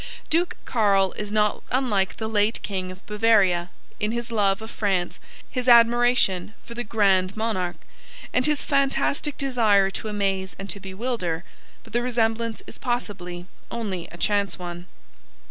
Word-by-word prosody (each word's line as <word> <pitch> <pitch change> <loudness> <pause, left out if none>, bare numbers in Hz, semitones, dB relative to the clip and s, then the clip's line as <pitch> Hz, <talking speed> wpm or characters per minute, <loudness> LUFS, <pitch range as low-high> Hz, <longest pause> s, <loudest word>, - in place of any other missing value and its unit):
Duke 340 +2 +2
Carl 200 -5 +3
is 210 -1 -6
not 210 -1 +1
unlike 230 -7 +1
the 220 - -3
late 215 +1 +1
King 185 -2 -3
of 185 +1 -13
Bavaria, 205 -5 +3 0.3
in 210 +1 0
his 235 0 -4
love 200 -3 +2
of 220 - -8
France, 190 -4 -1 0.3
his 250 -1 -4
admiration 235 -4 +4
for 235 - -9
the 240 +1 -4
Grand 200 -3 +2
Monarque 200 -6 -2 0.5
and 255 +2 +3
his 300 -1 +1
fantastic 280 +1 +1
desire 220 -8 +3
to 220 - -5
amaze 195 -4 -1
and 195 0 -6
to 200 - -7
bewilder, 190 -4 -3 0.4
but - - -17
the 240 - +2
resemblance 230 -2 0
is - - -10
possibly 185 -8 -3 0.2
only 190 -7 -4
a 170 - -10
chance 200 -1 +1
one. 175 0 -7
210 Hz, 150 wpm, -24 LUFS, 190-235 Hz, 0.5 s, admiration